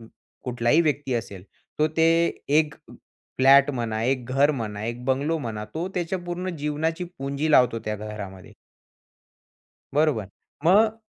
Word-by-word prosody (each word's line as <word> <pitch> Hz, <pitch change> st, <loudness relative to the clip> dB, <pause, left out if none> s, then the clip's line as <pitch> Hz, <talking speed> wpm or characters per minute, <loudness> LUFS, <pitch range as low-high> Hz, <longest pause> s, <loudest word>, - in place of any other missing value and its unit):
अं, 115 Hz, -, -13 dB, 0.4 s
कुठलाही 125 Hz, +5 st, +2 dB
व्यक्ती 145 Hz, -4 st, 0 dB
असेल. 100 Hz, -5 st, -5 dB, 0.3 s
तो 155 Hz, -, +4 dB
ते 160 Hz, 0 st, +5 dB, 0.5 s
एक 150 Hz, -1 st, +1 dB, 0.6 s
फ्लॅट 135 Hz, +2 st, +6 dB
म्हणा, 115 Hz, -4 st, -2 dB
एक 130 Hz, 0 st, 0 dB
घर 140 Hz, +3 st, +4 dB
म्हणा, 110 Hz, -7 st, -4 dB
एक 120 Hz, +2 st, -5 dB
बंगलो 140 Hz, +5 st, 0 dB
म्हणा. 110 Hz, -6 st, -5 dB
तो 170 Hz, +3 st, -2 dB
त्याच्या 180 Hz, +1 st, -1 dB
पूर्ण 180 Hz, +1 st, -3 dB
जीवनाची 155 Hz, +4 st, -2 dB
पुंजी 140 Hz, +3 st, -2 dB
लावतो 125 Hz, -5 st, +5 dB
त्या 105 Hz, 0 st, -2 dB
घरामध्ये. 100 Hz, -3 st, -8 dB, 1.4 s
बरोबर. 145 Hz, -9 st, +2 dB, 0.4 s
मग 215 Hz, +6 st, +5 dB
135 Hz, 135 wpm, -25 LUFS, 115-155 Hz, 1.4 s, फ्लॅट